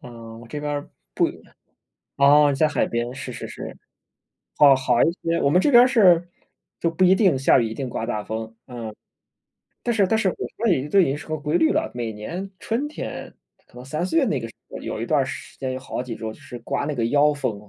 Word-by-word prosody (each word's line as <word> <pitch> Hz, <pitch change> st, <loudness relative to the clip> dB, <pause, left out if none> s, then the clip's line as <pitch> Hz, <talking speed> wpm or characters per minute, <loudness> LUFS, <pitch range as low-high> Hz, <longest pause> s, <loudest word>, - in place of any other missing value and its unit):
嗯， 115 Hz, -2 st, -11 dB
我 120 Hz, -, -13 dB
这 150 Hz, -, -5 dB
边 145 Hz, -1 st, -3 dB, 0.3 s
不 -, -, +3 dB, 0.9 s
哦， 145 Hz, +1 st, +5 dB
在 155 Hz, +3 st, +3 dB
海 150 Hz, -, 0 dB
边， 120 Hz, +1 st, -3 dB
是 -, -, -7 dB
是 -, -, -7 dB
是。 -, -, -8 dB, 0.8 s
哦， 140 Hz, -2 st, +8 dB
好 125 Hz, -2 st, +2 dB
一 165 Hz, -, +3 dB
些， 165 Hz, 0 st, 0 dB
我 140 Hz, -, +3 dB
们 180 Hz, +5 st, +4 dB
这 290 Hz, -, +2 dB
边 240 Hz, -2 st, +8 dB
儿 -, -, +4 dB
是 180 Hz, -8 st, +4 dB, 0.5 s
就 170 Hz, -, +1 dB
不 185 Hz, +3 st, +1 dB
一 185 Hz, -, +6 dB
定 190 Hz, -9 st, +3 dB
下 135 Hz, -, +4 dB
雨， 115 Hz, -, 0 dB
一 110 Hz, -, -6 dB
定 135 Hz, -2 st, -4 dB
刮 115 Hz, -, -4 dB
大 105 Hz, -1 st, -3 dB
风。 110 Hz, 0 st, -5 dB
嗯， 115 Hz, -3 st, -7 dB, 0.9 s
但 240 Hz, -, 0 dB
是 200 Hz, -4 st, +3 dB
但 220 Hz, +3 st, +1 dB
是 195 Hz, -, +2 dB
我 -, -, -6 dB
觉 230 Hz, 0 st, -2 dB
得 140 Hz, -1 st, -1 dB
都 195 Hz, +6 st, +4 dB
已 185 Hz, -, +5 dB
经 135 Hz, +2 st, -1 dB
是 -, -, -10 dB
个 155 Hz, -, -1 dB
规 150 Hz, +3 st, -1 dB
律 160 Hz, -, +3 dB
了， -, -, -1 dB
每 115 Hz, -2 st, -3 dB
年 175 Hz, -, -6 dB
春 240 Hz, +6 st, -2 dB
天， 300 Hz, -, -7 dB, 0.3 s
可 -, -, -35 dB
可 -, -, -28 dB
能 125 Hz, -, -10 dB
3、 155 Hz, +6 st, -3 dB
4 325 Hz, -, -2 dB
月 300 Hz, -, +5 dB
那 155 Hz, -, 0 dB
个 115 Hz, -, -5 dB
时 -, -, -15 dB, 0.2 s
候， -, -, -7 dB
有 -, -, -5 dB
一 -, -, -3 dB
段 -, -, +2 dB
儿 -, -, -1 dB
时 -, -, -8 dB
间， 130 Hz, -1 st, -3 dB
有 130 Hz, -, -4 dB
好 125 Hz, -, -5 dB
几 125 Hz, -2 st, -6 dB
周 110 Hz, -1 st, -5 dB
就 125 Hz, -, -17 dB
是 135 Hz, -4 st, -9 dB
刮 -, -, -2 dB
那 150 Hz, -, -2 dB
个 115 Hz, -3 st, 0 dB
妖 145 Hz, +4 st, +4 dB
风， 105 Hz, -7 st, -4 dB
145 Hz, 265 characters per minute, -23 LUFS, 120-175 Hz, 0.9 s, 哦